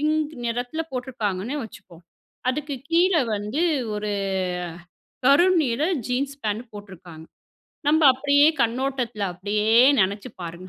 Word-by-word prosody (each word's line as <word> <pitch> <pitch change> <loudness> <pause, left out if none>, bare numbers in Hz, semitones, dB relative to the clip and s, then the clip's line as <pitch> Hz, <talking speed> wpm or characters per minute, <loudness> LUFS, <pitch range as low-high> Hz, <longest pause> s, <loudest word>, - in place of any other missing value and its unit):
Pink 310 0 0
நிறத்துல 245 +7 -2
போட்ருக்காங்கன்னே 245 -2 -3
வச்சுக்குவோம், 180 -5 -14 0.5
அதுக்கு 290 +2 -4 0.2
கீழே 345 0 +4 0.2
வந்து 210 +8 -3 0.4
ஒரு 210 0 -3 1.1
கரு 280 +6 +6 0.2
நீல 250 +2 -1 0.2
ஜீன்ஸ் 270 +3 -2
பேண்ட் 215 +2 -2
போட்ருக்காங்க. 180 -6 -11 0.6
நம்ம 315 +2 +4
அப்படியே 285 +2 +4 0.2
கண்ணோட்டத்துல 240 -2 -2
அப்டியே 205 +4 -2 0.3
நெனச்சு 200 +6 -1
பாருங்க, 175 +2 -8
240 Hz, 105 wpm, -23 LUFS, 205-285 Hz, 1.1 s, கரு